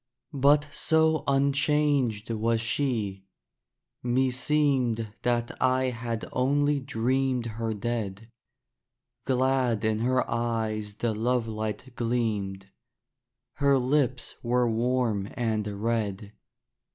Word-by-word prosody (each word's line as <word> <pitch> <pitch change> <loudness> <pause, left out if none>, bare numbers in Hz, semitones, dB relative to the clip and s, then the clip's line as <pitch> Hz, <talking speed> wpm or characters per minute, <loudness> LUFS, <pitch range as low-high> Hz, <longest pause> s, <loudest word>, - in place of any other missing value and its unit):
But 145 +2 +4
so 160 -2 +2
unchanged 140 -5 +2
was 115 +1 +1
she, 110 -6 -1 0.7
meseemed 125 -2 +1
That 120 -1 0
I 130 0 +2
had 115 -1 -4
only 145 +3 +2
dreamed 130 -1 0
her 115 -1 -3
dead; 110 0 -4 0.9
Glad 130 -4 +1
in 110 -1 +1
her 125 +2 +1
eyes 110 -3 -2
the 115 0 -1
lovelight 110 +1 -2
gleamed; 105 -5 -2 0.9
Her 140 -1 +4
lips 130 0 0
were 120 0 +2
warm 115 -3 0
and 110 -3 0 0.2
red. 105 -3 -2
120 Hz, 90 wpm, -27 LUFS, 110-130 Hz, 0.9 s, But